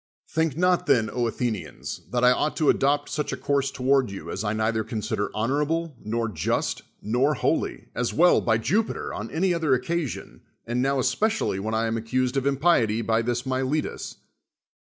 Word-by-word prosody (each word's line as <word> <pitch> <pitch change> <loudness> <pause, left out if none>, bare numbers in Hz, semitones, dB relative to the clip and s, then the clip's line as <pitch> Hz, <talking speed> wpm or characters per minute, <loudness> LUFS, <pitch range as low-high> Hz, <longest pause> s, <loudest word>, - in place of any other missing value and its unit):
Think 160 -3 0
not 180 0 +2
then, 110 -3 +3
Athenians, 115 -6 -3
that 120 0 0
I 125 - +7
ought 150 +4 0
to 155 -3 +5
adopt 145 +1 +1
such 150 - -2
a - - -3
course 140 -1 0
toward 130 -1 +2
you 100 - -7
as - - -3
I 105 - 0
neither 110 +1 0
con 110 0 -4
sider 110 -2 -1
honorable, 150 +7 0
nor 115 +2 -1
just, 85 -8 -1 0.2
nor 130 +7 +2
holy, - - -1
as 125 -1 -1
well, 175 +2 +5
by 115 -1 +2
Jupiter, 210 - -1
on 105 +2 -5
any 180 +3 +1
other 160 -6 +2
occasion, 150 +3 -3 0.2
and 120 +1 -1
now 135 +1 +1
espe 130 +11 +2
cially 155 - -1
when 110 +3 -2
I 110 +1 +1
am 115 0 -1
accused 125 +3 -1
of 135 0 +1
impiety 130 -7 +2
by 110 +1 +2
this 120 +2 -2
Miletus. 130 +3 -2
125 Hz, 180 wpm, -25 LUFS, 115-145 Hz, 0.2 s, I